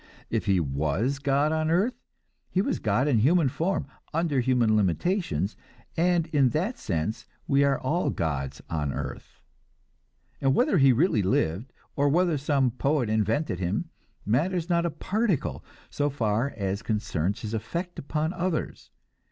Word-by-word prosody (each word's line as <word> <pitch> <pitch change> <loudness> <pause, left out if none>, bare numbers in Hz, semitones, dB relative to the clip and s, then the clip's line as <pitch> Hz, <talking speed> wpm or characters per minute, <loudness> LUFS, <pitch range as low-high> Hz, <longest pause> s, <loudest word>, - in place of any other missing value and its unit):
If - - -1
he 95 -2 +4
was 80 - -1
God 145 +2 +2
on 155 0 0
earth, 195 +9 +2 0.6
he 185 - 0
was 195 - 0
God 110 +6 +1
in 125 -6 +3
human 150 +5 +4
form, 175 +9 -1 0.3
under 165 -5 +1
human 120 -3 +3
limitations, 105 - 0 0.4
and 175 0 +2
in 140 -4 +4
that 200 +10 -2
sense 85 +3 -3 0.2
we 140 0 +3
are 140 -1 +2
all 160 +7 0
gods 70 -4 -3
on 75 -3 -2
earth. - - -7 1.0
And 135 -1 +3
whether 245 - +3
he 135 -1 +6
really 125 - +3
lived, 95 +5 0 0.2
or 145 0 +2
whether 170 0 +2
some 135 -3 +2
poet 130 -2 0
invented 110 - 0
him, 100 - -2 0.3
matters 170 - 0
not 170 0 +2
a - - 0
particle 185 - -1 0.3
so 145 0 0
far 120 -1 0
as 100 0 -2
concerns 105 -3 -1
his 110 -1 -5
effect 170 - -4
upon 155 +4 -2
others. 175 -2 -3
135 Hz, 150 wpm, -27 LUFS, 105-165 Hz, 1.0 s, he